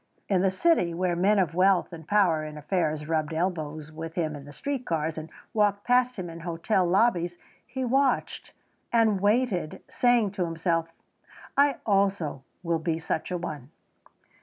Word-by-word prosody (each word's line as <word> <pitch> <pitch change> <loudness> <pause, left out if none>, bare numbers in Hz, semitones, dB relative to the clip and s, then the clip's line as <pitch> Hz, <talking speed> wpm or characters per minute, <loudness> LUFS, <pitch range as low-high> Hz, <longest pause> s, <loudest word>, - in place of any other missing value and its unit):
In 190 -3 +2
the 190 - +3
city 185 - +2
where 180 0 0
men 200 +4 +3
of 180 -5 +1
wealth 185 0 +3
and 160 -1 -10
power 180 -7 +3
in 155 0 -7
affairs 150 -1 -1
rubbed 160 -1 -1
elbows 155 -3 -3
with 160 +1 -7
him 155 -3 -1
in 140 -1 -10
the 145 - -11
street 275 - -4
cars 160 -5 -1
and 160 0 -7 0.2
walked 205 -2 +2
past 250 0 +3
him 185 -3 -5
in 165 0 -8
hotel 175 +3 0
lobbies 175 -3 +2 0.3
he 260 0 -3
watched 270 +3 0 0.4
and 220 -4 +3
waited 205 -6 0
saying 240 -5 +2
to 190 -3 -2
himself, 165 0 -1 0.7
"I 280 -1 +4
also 195 -9 +1 0.2
will 170 -1 0
be 160 0 -1
such 160 -1 -3
a 180 - -1
one." 150 -6 -6
175 Hz, 165 wpm, -27 LUFS, 160-205 Hz, 0.7 s, I